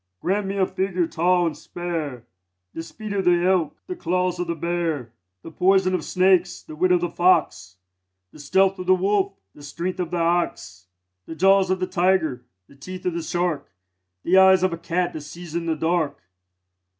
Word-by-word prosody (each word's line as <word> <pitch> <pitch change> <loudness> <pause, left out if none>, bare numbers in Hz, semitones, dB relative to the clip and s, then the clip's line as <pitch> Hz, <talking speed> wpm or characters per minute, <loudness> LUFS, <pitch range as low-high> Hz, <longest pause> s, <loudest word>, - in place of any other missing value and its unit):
Grant 195 +2 -1
me 195 +1 -3
a 190 - +3
figure 185 -1 -1
tall 175 +2 +1
and 160 -3 -2
spare; 160 -9 -5 0.5
The - - -5
speed 210 +5 -8
of 195 -1 0
the 175 -1 +3
elk, 180 -5 +1
the 365 - -5
claws 180 - -1
of 180 - -2
the 170 - -2
bear; 165 -7 -2 0.3
The 165 - -9
poison 185 +2 +2
of 180 -4 -1
snakes, 185 -1 +2
the 155 - -10
wit 180 +3 +1
of 180 -1 +3
the 175 - -1
fox; 130 - +1 0.6
The - - -15
stealth 190 +6 +2
of 180 - -6
the 185 - +6
wolf, 195 +1 0 0.2
the 145 - -16
strength 170 +6 -5
of 175 -2 -2
the 175 - -3
ox; 165 - -1 0.4
The 160 - -7
jaws 195 +2 +4
of 185 0 0
the 185 - 0
tiger, 175 -9 0 0.2
the - - -19
teeth 185 +6 -9
of 180 - 0
the 170 - -3
shark; 175 -1 -2 0.5
The 185 +2 +4
eyes 190 -1 +6
of 185 -2 +1
a - - -4
cat 175 +1 -1
that 155 - -6
sees 165 +2 -10
in 170 0 -3
the 160 - 0
dark. 160 -2 0
175 Hz, 200 wpm, -23 LUFS, 165-185 Hz, 0.6 s, the